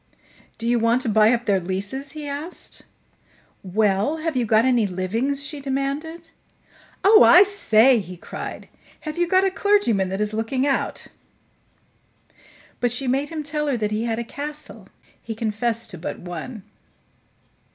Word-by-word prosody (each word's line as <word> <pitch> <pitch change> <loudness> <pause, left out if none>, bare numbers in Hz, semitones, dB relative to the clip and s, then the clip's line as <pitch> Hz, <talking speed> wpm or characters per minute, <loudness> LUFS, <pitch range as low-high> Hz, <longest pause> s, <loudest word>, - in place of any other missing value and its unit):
"Do 230 - -6
you 240 0 +2
want 230 +3 +2
to 230 - -1
buy 215 +1 +5
up 240 -1 0
their 195 -2 +2
leases?" 200 +10 -4
he 305 -1 -7
asked. 290 +5 -7 0.8
"Well, 205 - +1
have 320 -2 -3
you 245 -3 0
got 220 +2 +4
any 245 -5 +3
livings?" 225 +10 -1
she 290 0 -5
demanded. 285 +5 -3 0.7
"Oh, 430 +3 +7
I 365 - +9
say!" 260 - +4
he 180 -3 -8
cried. - - -8 0.3
"Have 310 +2 -6
you 350 - +2
got 375 +2 +3
a 385 - +1
clergyman 375 - +2
that 190 +1 -3
is 210 0 -1
looking 225 +5 -1
out?" 275 -2 -1 1.7
But 245 -1 +1
she 245 +3 -1
made 270 +3 0
him 320 -2 -5
tell 300 0 -2
her 270 -4 0
that 210 -2 -2
he 215 +2 -1
had 225 -1 -1
a 235 - -2
castle; 295 +5 -8 0.3
he 225 - -6
confessed 225 +1 -2
to 180 - -9
but 170 - -5
one. 180 +5 -7
245 Hz, 160 wpm, -22 LUFS, 215-295 Hz, 1.7 s, I